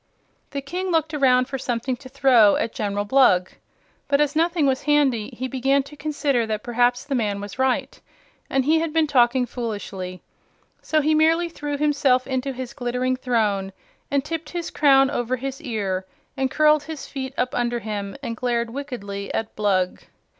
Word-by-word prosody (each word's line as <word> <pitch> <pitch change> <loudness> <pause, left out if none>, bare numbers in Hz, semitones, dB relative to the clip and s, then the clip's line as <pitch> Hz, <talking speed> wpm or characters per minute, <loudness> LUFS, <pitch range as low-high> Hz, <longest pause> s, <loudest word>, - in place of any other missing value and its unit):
The 280 - -4
King 360 +7 -4
looked 320 -2 +1
around 255 -3 +4
for 270 -1 -4
something 250 0 -2
to 260 -1 -12
throw 255 -6 +5
at 230 - -2
General 205 -1 -2
Blug, 205 -7 +4 0.6
but 280 0 +2
as 295 0 +1
nothing 335 -1 +2
was 265 -1 +1
handy 280 -7 +2
he 260 - -3
began 270 +1 +1
to 280 +2 -13
consider 285 -5 0
that 215 0 -3
perhaps 245 +1 +1
the 285 - -3
man 210 -5 0
was 205 +4 -8
right 260 -1 0 0.5
and 265 -1 +1
he 320 +2 +4
had 325 -1 -2
been 325 -1 +3
talking 250 -3 +3
foolishly. 200 -7 -5 0.6
So 310 -1 +1
he 310 +2 +2
merely 325 +2 +3
threw 295 -3 -4
himself 280 -4 +2
into 260 0 -2
his 255 -1 -6
glittering 250 0 -1
throne 210 -6 0 0.4
and 280 0 0
tipped 320 0 -4
his 345 -2 -4
crown 270 -2 +4
over 245 -2 -1
his 270 +3 -5
ear 200 -8 -3 0.3
and 265 -1 0
curled 305 +2 +4
his 315 -2 -7
feet 265 -1 -6
up 250 - 0
under 240 0 0
him 205 -3 -5
and 235 -3 -3
glared 235 -1 -1
wickedly 230 -8 -6
at 220 - -3
Blug. 190 -3 0
260 Hz, 175 wpm, -23 LUFS, 230-285 Hz, 0.6 s, throw